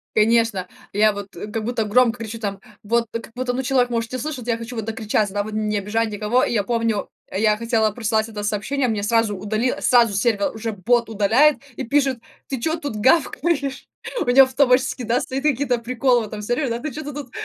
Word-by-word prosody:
Конечно. 220 -4 +2 0.3
Я 215 +1 +4
вот, 200 -2 -8
э, 190 - -6
как 215 0 -4
будто 235 -2 -1
громко 235 +2 +3
кричу 225 0 -6
там, 200 -3 -4 0.2
вот 230 +2 +1
как 230 0 -6
будто, 250 0 -1
ну, 255 +2 -2
человек 255 -2 +2
может 230 +1 -2
не - - -1
слышать, 255 -3 -5
я 230 -1 +1
хочу 230 +1 -7
вот 220 - -3
докричаться, 215 -2 -1
да, 205 0 0
вот, 215 - -7
не 215 -1 -1
обижать 220 +3 -1
никого. 210 +5 +1
И - - -2
я 205 -3 +1
помню, 230 -2 -1 0.2
я 210 +1 +2
хотела 225 -2 +1
прослать 220 0 -1
это 210 -1 -6
сообщение, 245 +6 -1
мне 210 -3 -1
сразу 225 -1 +2
удалила 215 +6 -1
сразу 235 -4 +4
сервер 205 0 +1
уже 225 0 -3
бот 230 +4 +1
удаляет 225 +8 +4 0.2
и - - -4
пишет: 270 -1 +1 0.3
"Ты 265 -4 -4
чё 320 +3 0
тут 285 -8 -5
гавкаешь?" 280 +3 +1 0.3
У - - 0
меня 255 +2 +7
автоматически, 260 -1 +2
да, 240 +2 +1
стоят 270 -2 -4
какие-то 270 -4 +1
приколы 245 0 +1
в - - -8
этом 210 0 -7
сервере, 245 +4 -1
да: 230 - -1
"Ты 305 - -4
чё-то 295 -1 -6
тут, 275 -4 -8
230 Hz, 215 wpm, -22 LUFS, 215-255 Hz, 0.3 s, меня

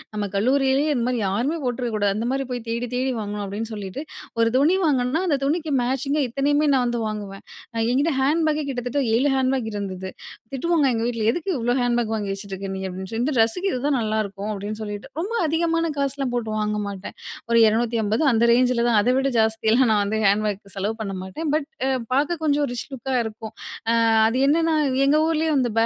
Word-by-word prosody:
நம்ம 210 -1 -1
கல்லூரியிலயே 270 +6 +2
இந்த 235 - 0
மாதிரி 245 -3 0
யாருமே 245 +12 0
போட்டுருக்க 245 -2 -2
கூடாது. 205 -1 +2
அந்த 230 +2 -2
மாதிரி 270 0 -1
போய் 245 -1 -3
தேடி 235 +1 -2
தேடி 260 +1 0
வாங்கணும் 205 0 -4
அப்படின்னு 210 +3 -4
சொல்லிட்டு, 205 +6 -5 0.4
ஒரு 230 0 +4
துணி 310 +7 +4
வாங்குனனா 270 +2 +1
அந்த 290 -4 +2
துணிக்கு 315 +1 -1
மேச்சிங்கா 270 +4 0
இத்தனையுமே 290 +4 +1
நான் 255 -2 +3
வந்து 240 -1 -1
வாங்குவேன். 205 -2 -6 0.5
என்கிட்டே 285 +4 +2
ஹேண்ட் 310 +5 +2
பேக்கே 305 0 0
கிட்டத்தட்ட 250 +2 -2 0.2
7 265 +5 +3
ஹேண்ட்பேக் 260 -3 0
இருந்தது. 190 -2 -4 0.4
திட்டுவாங்க 320 +2 +1
எங்க 225 0 -1
வீட்டுல 230 -3 -2
எதுக்கு 345 +7 -4
இவ்ளோ 240 +1 +1
ஹேண்ட்பேக் 240 -2 +1
வாங்கி 205 -2 -3
வச்சுட்ருக்க 195 -1 -7
நீ - - -4
அப்படின்னு 190 +1 -6
சொல்லி 225 +2 -1
இந்த 300 - 0
ட்ரெஸ்ஸுக்கு 230 - +2
இதுதான் 275 +2 0
நல்லாருக்கும் 215 -2 -2
அப்படின்னு 205 +1 -5
சொல்லிட்டு, 205 -1 -6
ரொம்ப 405 +7 -3
அதிகமான 330 +1 +1
காசெல்லாம் 275 -2 -1
போட்டு 235 -3 -2
வாங்க 210 0 -1
மாட்டேன். 200 -1 -7 0.3
ஒரு 230 - +4
250 225 +2 +1
அந்த 230 0 +2
ரேஞ்சில 245 -1 +3
தான் 225 -3 +4
அதை 245 +4 +2
விட 270 0 +2
ஜாஸ்தியெல்லாம் 220 +2 +3
நான் 210 -1 +3
வந்து 210 +2 -1
ஹேண்ட் 205 +2 +3
பேக்கு 200 -1 -4
செலவு 205 +3 -2
பண்ண 195 -2 -3
மாட்டேன். 205 - -4
பட் 305 -1 -1 0.5
பார்க்க 300 +5 +1
கொஞ்சம் 290 -1 +2
ரிச் 245 - -5
லுக்கா 265 +1 -4
இருக்கும். 220 0 -7 0.7
அது 235 +3 0
என்னென்னா 325 +1 +3 0.3
எங்க 300 +2 +4
ஊரிலயே 320 0 +1
வந்து 245 -3 +1
240 Hz, 190 wpm, -23 LUFS, 215-280 Hz, 0.7 s, ஒரு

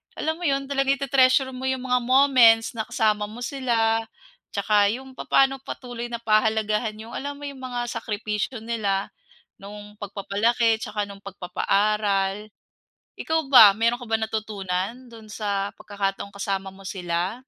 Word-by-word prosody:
alam 315 +2 -2
mo 350 - -1
'yon, 275 -1 +1
talaga 275 0 +1
iti-treasure 265 -1 +3
mo 260 +1 -5
'yong 260 -1 -1
mga 250 -1 +2
moments 255 -4 +5
na 220 -2 -5
kasama 210 -1 +1
mo 230 +4 -8
sila 230 -4 +1 0.6
tsaka 205 0 +3
'yong 265 +1 -10
papa'no 270 +1 +2
patuloy 245 -3 -7
na 235 -1 -6
pahalagahan 215 0 +1
'yong 220 +2 -10
alam 285 +3 -5
mo 290 - -12
'yong 280 -2 -7
mga 245 -2 -4
sakripisyo 215 +1 -3
nila 205 -4 -1 0.5
no'ng 210 +1 -11
pagpapalaki 220 +3 0
tsaka 210 -2 -3
no'ng 200 -1 -9
pagpapaaral. 200 +1 0 0.7
Ikaw 320 0 0
ba, 215 -6 +10
meron 230 +2 +1
ka 245 - -9
bang 225 0 +1
natutunan 215 +2 -4
do'n 225 -2 -13
sa 200 -2 -2
pagkakataong 200 -1 -4
kasama 195 -1 -3
mo 195 +1 -15
sila? 175 0 -2
220 Hz, 150 wpm, -24 LUFS, 205-255 Hz, 0.7 s, ba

